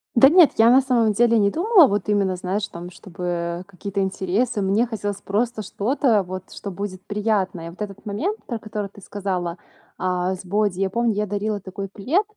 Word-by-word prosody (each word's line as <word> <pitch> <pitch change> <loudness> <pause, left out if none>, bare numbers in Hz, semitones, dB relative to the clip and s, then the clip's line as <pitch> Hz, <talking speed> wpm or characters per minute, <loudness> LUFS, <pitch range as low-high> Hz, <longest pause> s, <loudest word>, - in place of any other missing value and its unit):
Да 270 +3 +8
нет, 340 -1 +7
я 225 +1 +6
на 260 - +7
самом 240 -4 +2
деле 230 +2 +3
не 200 -2 +4
думала, 365 - +5
вот 205 -2 -1
именно, 200 -3 +1
знаешь 190 +3 -2
там, 175 +1 -8
чтобы, 180 -1 -11
э, 170 0 -2
какие-то 195 +1 -5
интересы. 195 +4 0
Мне 200 +5 +2
хотелось 205 -3 -4
просто 220 +3 -1
что-то 220 - +1
вот, 185 0 -8
что 200 - -6
будет 190 0 -5
приятное. 205 -5 -1
Вот 180 - -13
этот 200 -2 -6
момент, 310 - -2
про 235 - -3
который 210 -2 -5
ты 200 +1 -16
сказала, 185 -3 -3 0.4
э, 185 0 0
с - - -18
боди: 200 0 0
я 195 0 +1
помню, 235 +2 +1
я 210 +1 0
дарила 205 +1 -2
такой 195 +1 -7
плед. 260 - 0
205 Hz, 195 wpm, -22 LUFS, 185-225 Hz, 0.4 s, Да